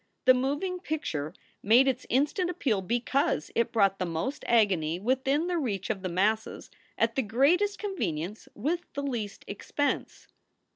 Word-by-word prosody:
The 255 Hz, -, +8 dB
moving 290 Hz, +9 st, -1 dB
picture 160 Hz, -, -3 dB, 0.3 s
made 240 Hz, +6 st, +5 dB
its 260 Hz, -1 st, -1 dB
instant 295 Hz, -, +1 dB
appeal 260 Hz, -, 0 dB
because 235 Hz, -, 0 dB
it 235 Hz, -, +1 dB
brought 195 Hz, -3 st, +2 dB
the 185 Hz, -, 0 dB
most 170 Hz, -, -3 dB
agony 185 Hz, -8 st, +2 dB
within 265 Hz, -, +1 dB
the 355 Hz, -1 st, 0 dB
reach 205 Hz, -, -2 dB
of 195 Hz, -, -4 dB
the 185 Hz, -, -3 dB
masses 210 Hz, +5 st, -1 dB, 0.3 s
at -, -, +2 dB
the 270 Hz, -, +1 dB
greatest 290 Hz, -, +2 dB
convenience 210 Hz, -, -3 dB
with 305 Hz, +11 st, -1 dB
the 280 Hz, -, -3 dB
least 230 Hz, -7 st, -4 dB
expense. 285 Hz, +8 st, -3 dB
245 Hz, 150 wpm, -28 LUFS, 195-290 Hz, 0.3 s, The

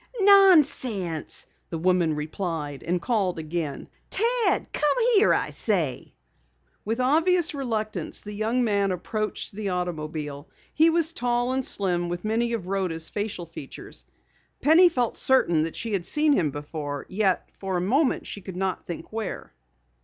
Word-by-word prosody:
"Nonsense!" 290 Hz, -, +4 dB, 0.2 s
the 165 Hz, -, -3 dB
woman 175 Hz, -2 st, +2 dB
replied, 150 Hz, -2 st, -4 dB
and 175 Hz, +2 st, -1 dB
called 195 Hz, -4 st, 0 dB
again. 155 Hz, -2 st, -4 dB, 0.2 s
"Ted! 470 Hz, +1 st, +1 dB
Come 300 Hz, +9 st, +1 dB, 0.2 s
here, 420 Hz, 0 st, +5 dB
I -, -, +1 dB
say!" 170 Hz, -, -1 dB, 0.7 s
With 225 Hz, +3 st, -2 dB
obvious 330 Hz, +6 st, +3 dB
reluctance, 225 Hz, -6 st, -3 dB
the 210 Hz, -, -8 dB
young 225 Hz, +4 st, 0 dB
man 200 Hz, -3 st, +1 dB
approached 215 Hz, +4 st, -3 dB
the 205 Hz, -1 st, -4 dB
automobile. 155 Hz, -4 st, -4 dB, 0.2 s
He 320 Hz, +2 st, +5 dB
was 330 Hz, 0 st, +1 dB
tall 245 Hz, 0 st, 0 dB
and 265 Hz, 0 st, 0 dB
slim 175 Hz, -6 st, -1 dB
with 175 Hz, +3 st, -4 dB
many 235 Hz, +2 st, 0 dB
of 220 Hz, -6 st, -3 dB
Rhoda's 180 Hz, -4 st, -2 dB
facial 205 Hz, -4 st, -3 dB
features. 135 Hz, -, -9 dB, 0.5 s
Penny 330 Hz, +5 st, +6 dB
felt 245 Hz, -7 st, -1 dB
certain 175 Hz, -12 st, +3 dB
that 165 Hz, +1 st, -3 dB
she 230 Hz, -2 st, -4 dB
had 185 Hz, -4 st, -1 dB
seen 300 Hz, 0 st, +3 dB
him 170 Hz, -, +2 dB
before, 145 Hz, 0 st, -5 dB
yet 190 Hz, -1 st, 0 dB
for 190 Hz, -2 st, -2 dB
a -, -, -1 dB
minute 260 Hz, -, +1 dB
she 200 Hz, -, -7 dB
could 185 Hz, -1 st, -8 dB
not 190 Hz, -1 st, -2 dB
think 170 Hz, +3 st, -8 dB
where. 220 Hz, -2 st, -5 dB
200 Hz, 150 wpm, -25 LUFS, 170-255 Hz, 0.7 s, Penny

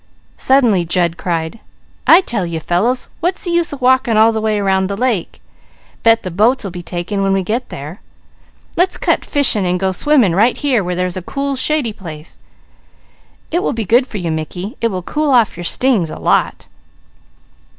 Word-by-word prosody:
Suddenly 240 Hz, -9 st, +3 dB
Jud 170 Hz, 0 st, 0 dB
cried: 170 Hz, +3 st, -3 dB, 0.5 s
"I 340 Hz, -, +8 dB
tell 230 Hz, -, -2 dB
you 170 Hz, -2 st, -3 dB
fellows, 215 Hz, +11 st, 0 dB
what's 355 Hz, +3 st, -2 dB
the 350 Hz, -, -1 dB
use 340 Hz, 0 st, +1 dB
of 285 Hz, -2 st, -7 dB
walking 250 Hz, -3 st, +3 dB
all 220 Hz, +1 st, +6 dB
the 220 Hz, -1 st, -2 dB
way 215 Hz, -1 st, 0 dB
round 190 Hz, -1 st, +1 dB
the 200 Hz, -, -3 dB
lake? 235 Hz, -7 st, -1 dB, 0.6 s
Bet 230 Hz, 0 st, +4 dB
the 185 Hz, -, -5 dB
boats 225 Hz, +9 st, +2 dB
will 195 Hz, -, -5 dB
be 175 Hz, 0 st, -7 dB
taken 175 Hz, +3 st, -4 dB
when 195 Hz, 0 st, +1 dB
we 195 Hz, -1 st, 0 dB
get 230 Hz, +7 st, -3 dB
there! 150 Hz, +7 st, -8 dB, 0.7 s
Let's 365 Hz, +2 st, +1 dB
cut -, -, 0 dB
fishing 270 Hz, -8 st, +1 dB
and 180 Hz, 0 st, 0 dB
go 190 Hz, 0 st, 0 dB
swimming 245 Hz, -, +2 dB
right 220 Hz, +7 st, +3 dB
here 260 Hz, -8 st, +1 dB
where 180 Hz, 0 st, -3 dB
there's 180 Hz, 0 st, -2 dB
a -, -, -4 dB
cool, 275 Hz, +8 st, -3 dB
shady 270 Hz, -4 st, 0 dB
place. 160 Hz, -5 st, -10 dB, 1.1 s
It 345 Hz, +2 st, +1 dB
will -, -, -1 dB
be 225 Hz, -2 st, -3 dB
good 245 Hz, +6 st, +3 dB
for 215 Hz, -, -6 dB
you 175 Hz, -4 st, -3 dB
Mickey, 175 Hz, -, -5 dB
it 230 Hz, -, +2 dB
will 185 Hz, -5 st, -4 dB
cool 300 Hz, -, -1 dB
off 240 Hz, -6 st, +3 dB
your 175 Hz, -, -7 dB
stings 225 Hz, -6 st, +1 dB
a -, -, -7 dB
lot." -, -, 0 dB
210 Hz, 190 wpm, -16 LUFS, 180-255 Hz, 1.1 s, I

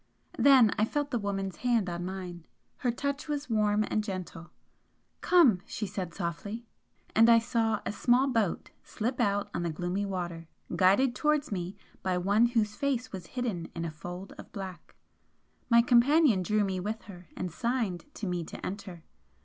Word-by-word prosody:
Then 255 Hz, -4 st, +7 dB
I 215 Hz, -, +4 dB
felt 290 Hz, +4 st, -2 dB
the 240 Hz, -, 0 dB
woman's 195 Hz, -2 st, -3 dB
hand 235 Hz, -5 st, +1 dB
on 175 Hz, 0 st, -3 dB
mine. 180 Hz, -3 st, -6 dB, 0.3 s
Her 250 Hz, -, -1 dB
touch 280 Hz, +5 st, -2 dB
was 290 Hz, -3 st, -3 dB
warm 210 Hz, -1 st, +2 dB
and 215 Hz, -, 0 dB
gentle. 185 Hz, -4 st, -6 dB, 0.7 s
"Come!" 300 Hz, -, +5 dB
she 220 Hz, -, -3 dB
said, 190 Hz, -3 st, -4 dB
softly. 200 Hz, +6 st, -4 dB, 0.5 s
And 225 Hz, +1 st, +7 dB
I 230 Hz, -, +8 dB
saw 225 Hz, -2 st, 0 dB
a -, -, -1 dB
small 245 Hz, +4 st, +3 dB
boat 225 Hz, -9 st, 0 dB
slip 245 Hz, +4 st, -3 dB
out 205 Hz, -3 st, +1 dB
on -, -, -2 dB
the 170 Hz, -, -1 dB
gloomy 180 Hz, +5 st, -2 dB
water, 175 Hz, -3 st, -4 dB, 0.3 s
guided 200 Hz, +8 st, +4 dB
towards 300 Hz, 0 st, +1 dB
me 180 Hz, -1 st, -4 dB, 0.2 s
by 185 Hz, -1 st, 0 dB
One 200 Hz, +6 st, +3 dB
whose 225 Hz, -3 st, 0 dB
face 255 Hz, -3 st, -1 dB
was 185 Hz, -4 st, -7 dB
hidden 205 Hz, -10 st, -2 dB
in 170 Hz, 0 st, -3 dB
a 165 Hz, -, -3 dB
fold 175 Hz, +4 st, -8 dB
of -, -, -11 dB
black. 190 Hz, -3 st, -8 dB, 0.7 s
My 235 Hz, -1 st, +6 dB
companion 245 Hz, -, +5 dB
drew 210 Hz, +3 st, +1 dB
me 190 Hz, -2 st, -1 dB
with 215 Hz, +3 st, -4 dB
her 185 Hz, -2 st, -12 dB
and 180 Hz, -, -3 dB
signed 230 Hz, -3 st, -1 dB
to 215 Hz, -, -5 dB
me 180 Hz, -2 st, -2 dB
to -, -, -8 dB
enter. 185 Hz, -4 st, -6 dB
205 Hz, 175 wpm, -29 LUFS, 180-240 Hz, 0.7 s, I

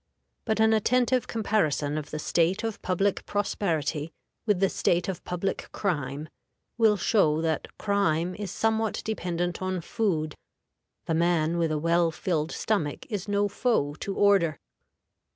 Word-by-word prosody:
But 220 Hz, -1 st, 0 dB
an 220 Hz, 0 st, +5 dB
attentive 250 Hz, +3 st, +2 dB
comparison 160 Hz, -10 st, 0 dB
of 150 Hz, -1 st, -4 dB
the 155 Hz, -, -4 dB
state 170 Hz, +6 st, +1 dB
of 225 Hz, -2 st, -3 dB
public 195 Hz, +2 st, 0 dB
prosperity 165 Hz, -7 st, -1 dB, 0.4 s
with 205 Hz, -4 st, +3 dB
the 195 Hz, -, +4 dB
state 175 Hz, -1 st, +1 dB
of 190 Hz, -3 st, -4 dB
public 180 Hz, +2 st, -3 dB
crime 150 Hz, -5 st, -2 dB, 0.5 s
will 220 Hz, -3 st, +4 dB
show 165 Hz, -6 st, +3 dB
that 160 Hz, -1 st, -1 dB
crime 185 Hz, -4 st, +1 dB
is 205 Hz, +1 st, -5 dB
somewhat 220 Hz, +2 st, 0 dB
dependent 175 Hz, -5 st, -2 dB
on 185 Hz, -1 st, -1 dB
food: 160 Hz, -4 st, -1 dB, 0.7 s
the 165 Hz, -, -1 dB
man 170 Hz, 0 st, +2 dB
with 165 Hz, -2 st, +1 dB
a 155 Hz, -, 0 dB
well 170 Hz, +2 st, +2 dB
filled 160 Hz, -1 st, -2 dB
stomach 165 Hz, -10 st, -1 dB
is 205 Hz, -1 st, -3 dB
no 205 Hz, 0 st, +2 dB
foe 200 Hz, -, 0 dB
to 195 Hz, -, -4 dB
order. 195 Hz, -8 st, +3 dB
180 Hz, 145 wpm, -27 LUFS, 160-205 Hz, 0.7 s, an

